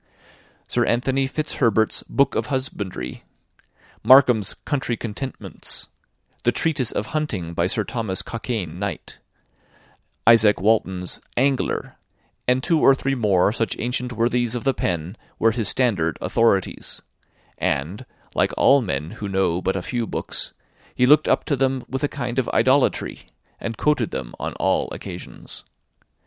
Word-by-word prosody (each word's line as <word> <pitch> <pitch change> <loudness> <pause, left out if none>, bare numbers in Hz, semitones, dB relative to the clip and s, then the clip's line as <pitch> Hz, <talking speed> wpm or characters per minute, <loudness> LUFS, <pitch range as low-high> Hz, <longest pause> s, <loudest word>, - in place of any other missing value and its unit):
Sir - - +1
Anthony 135 +3 +1
Fitzherbert's 115 -7 +1
"Book 140 - +2
of - - -1
Husbandry;" 100 - -4 0.8
Markham's 125 -6 +5
"Country 135 -5 -1
Contentments;" 125 +4 -5 0.5
the 120 - +3
"Tretyse 145 -4 0
of 105 - -4
Hunting," 105 - -2
by 85 +1 +1
Sir - - 0
Thomas 110 -7 -3
Cockayne, 110 -8 -4
Knight; 100 -1 -5 1.1
Izaak 110 -3 +6
Walton's 95 -3 0 0.2
"Angler," 135 +1 0 0.5
and 125 +1 +2
two 165 -1 +2
or 135 - +6
three 135 0 -1
more 100 -6 +3
such 115 0 -1
ancient 125 +1 -2
worthies 120 0 +1
of 120 - -3
the 135 0 +2
pen, 85 +2 -3 0.2
were 115 - +3
his 110 -3 +2
standard 95 - +1
authorities; 105 -5 0 0.6
and, 85 - -2 0.3
like - - +1
all 140 0 +5
men 75 - -3
who 100 - -6
know 95 -2 +1
but 95 - 0
a 95 - -3
few 120 -3 -2
books, - - -2 0.4
he 125 - +3
looked 150 +3 +5
up - - +2
to 145 - +1
them 135 -1 0
with 135 +1 -4
a - - +3
kind 125 -3 -3
of 130 - -1
idolatry, 130 +4 +2 0.3
and 115 -1 -5
quoted 150 -7 +1
them 65 -2 -5
on - - -3
all - - 0
occasions. - - -9
115 Hz, 140 wpm, -22 LUFS, 95-130 Hz, 1.1 s, Izaak